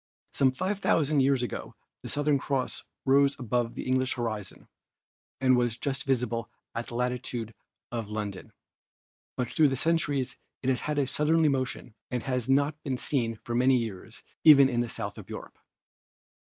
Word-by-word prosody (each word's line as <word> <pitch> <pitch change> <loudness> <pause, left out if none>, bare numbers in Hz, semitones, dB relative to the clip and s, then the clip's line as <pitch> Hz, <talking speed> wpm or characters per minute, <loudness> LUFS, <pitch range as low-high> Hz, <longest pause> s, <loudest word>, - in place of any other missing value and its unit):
Some 130 -2 +4
5,000 160 -2 +1
years 135 -1 +3
ago 120 - -5 0.3
the - - -7
Southern 145 -1 +2
Cross 135 -1 -2 0.2
rose 140 +1 +4
above 120 -1 -1
the - - -4
English 130 0 +1
horizon 110 -5 -4 0.7
and 130 -1 +4
was 120 -2 +1
just 135 +3 -2
visible 120 -3 0 0.3
in 115 - -1
the 120 - -7
latitude 125 -2 -2 0.4
of 115 -3 -4
London, 105 -3 -5 0.9
but 125 - 0
through 155 +5 +4
the 135 - -1
centuries 145 -5 0 0.3
it 130 - +1
has 130 - +2
had 150 -1 -2
a 140 - +3
southerly 150 +4 +3
motion 130 -4 -2 0.2
and 125 -1 -2
has 125 -2 -2
not 145 +3 +2
been 135 -4 -2
seen 120 -4 -1
for 120 - -4
many 125 +2 +4
years 110 -6 -6 0.2
even 140 -4 +8
in 120 -2 +1
the 120 - -2
south - - -4
of - - -12
Europe. - - -8
130 Hz, 165 wpm, -28 LUFS, 120-140 Hz, 0.9 s, even